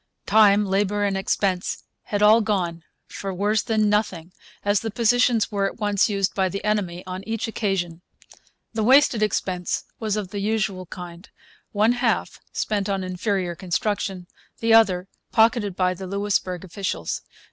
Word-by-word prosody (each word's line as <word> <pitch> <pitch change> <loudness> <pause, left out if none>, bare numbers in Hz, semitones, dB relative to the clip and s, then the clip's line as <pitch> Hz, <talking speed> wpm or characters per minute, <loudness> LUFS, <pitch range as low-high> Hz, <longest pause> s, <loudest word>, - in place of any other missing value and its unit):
Time, 210 -1 +5
labour, 200 +1 0
and 200 -1 +1
expense 195 -1 -1 0.2
had 205 0 -1
all 215 +2 +7
gone 180 -6 -1 0.2
for 195 - -6
worse 205 +4 +1
than 215 -1 +1
nothing, 190 -5 -1 0.3
as 205 0 +3
the 225 - -4
positions 235 0 +2
were 200 -1 +1
at - - -7
once 205 -1 +2
used 195 -2 0
by 190 -1 +1
the 200 +2 -5
enemy 190 -4 -1
on 185 +1 -6
each 225 0 -2
occasion. 190 -6 -2 0.7
The 220 - -1
wasted 260 -1 +5
expense 185 -4 -1 0.2
was 215 -2 -1
of 200 -3 -3
the 205 - -5
usual 195 -3 -1
kind 175 +2 -9 0.4
one 215 +2 +3
half 245 -1 0
spent 205 -2 -1
on 195 -1 -1
inferior 185 0 -2
construction, 190 +1 -2 0.3
the 225 0 +2
other 195 -5 +4 0.2
pocketed 220 -4 +3
by 185 -1 +1
the 190 +1 -8
Louisbourg 195 -2 -1
officials. 185 - -3
200 Hz, 155 wpm, -23 LUFS, 185-215 Hz, 0.7 s, all